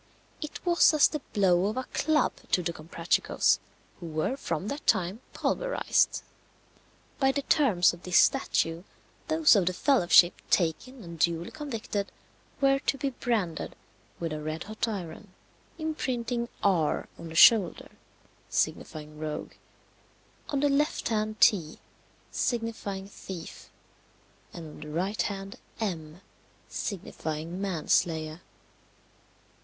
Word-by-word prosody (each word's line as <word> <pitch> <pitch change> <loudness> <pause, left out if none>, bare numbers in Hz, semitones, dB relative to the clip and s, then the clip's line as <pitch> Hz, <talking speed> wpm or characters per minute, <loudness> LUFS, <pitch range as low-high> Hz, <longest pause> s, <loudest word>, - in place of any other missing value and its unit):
It 305 +3 -7
was 345 -2 +5
as 300 - +6
the 300 - -3
blow 185 -2 +3
of 215 +4 -3
a 260 - -1
club 305 0 +2 0.2
to 180 - +3
the 170 0 -2
Comprachicos, 165 +1 +1 0.4
who 175 - -7
were 155 +10 -1
from 170 - -3
that 285 +2 -6
time 190 +2 +2
pulverized. - - +1 1.0
By 270 -1 +4
the 280 +1 -2
terms 220 - +4
of 175 - -11
this 180 -2 +1
statute 165 +1 +2 0.4
those 315 -5 +5
of 190 -4 +2
the 185 - +2
fellowship 180 -7 +5 0.2
taken 215 +9 0
and 170 -2 -9
duly 170 +1 +1
convicted 230 -9 -4 0.5
were 275 -1 +4
to 275 - -1
be 275 +1 -2
branded 220 -10 -2 0.4
with 165 -2 -3
a 155 - -4
red 155 +2 -4
hot 215 +2 -3
iron, 190 -1 -6 0.4
imprinting 245 -7 -2
R. 175 -6 +2
on 170 - -7
the 160 - -9
shoulder, 200 0 +6 0.6
signifying 150 0 -2
rogue; 155 -1 -5 1.0
on 280 -2 0
the 290 - +3
left 285 -1 +1
hand 215 -1 -1
T, 175 -9 +4 0.5
signifying 225 -5 -2
thief; 190 -3 -9 0.8
and 165 -2 -8
on 150 - -12
the 150 - -8
right 180 +5 -1
hand 195 0 -4 0.2
M, 170 -5 -4 0.5
signifying 165 -2 -5
man 185 -6 -3
slayer. 160 0 +1
195 Hz, 130 wpm, -28 LUFS, 165-250 Hz, 1.0 s, as